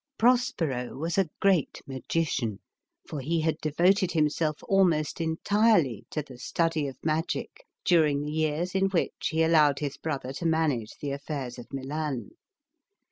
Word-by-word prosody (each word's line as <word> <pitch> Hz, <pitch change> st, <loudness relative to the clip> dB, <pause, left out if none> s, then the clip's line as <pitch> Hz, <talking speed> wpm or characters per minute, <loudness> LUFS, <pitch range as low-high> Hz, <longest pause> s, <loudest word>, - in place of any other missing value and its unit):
Prospero 220 Hz, -, +1 dB
was 165 Hz, +6 st, -1 dB
a 190 Hz, -4 st, +2 dB
great 190 Hz, -7 st, +2 dB
magician, 135 Hz, -5 st, -2 dB, 0.5 s
for 150 Hz, -, -5 dB
he 160 Hz, +5 st, 0 dB
had 160 Hz, 0 st, 0 dB
devoted 180 Hz, +5 st, +2 dB
himself 155 Hz, -1 st, 0 dB
almost 175 Hz, -5 st, +2 dB
entirely 165 Hz, -, +2 dB
to 150 Hz, -, -3 dB
the 130 Hz, -3 st, -13 dB
study 160 Hz, +2 st, 0 dB
of 135 Hz, -, -7 dB
magic 165 Hz, -, -2 dB, 0.2 s
during 150 Hz, -5 st, +3 dB
the 150 Hz, -, -3 dB
years 155 Hz, +3 st, -1 dB
in 195 Hz, 0 st, +2 dB
which 185 Hz, -3 st, -1 dB
he 160 Hz, 0 st, +2 dB
allowed 155 Hz, -4 st, +4 dB
his 145 Hz, -2 st, -3 dB
brother 135 Hz, -4 st, -4 dB
to 170 Hz, -, -5 dB
manage 150 Hz, -9 st, 0 dB
the 145 Hz, -, -2 dB
affairs 140 Hz, -3 st, -5 dB
of 120 Hz, -, -11 dB
Milan. 140 Hz, 0 st, -3 dB
155 Hz, 145 wpm, -28 LUFS, 140-170 Hz, 0.5 s, allowed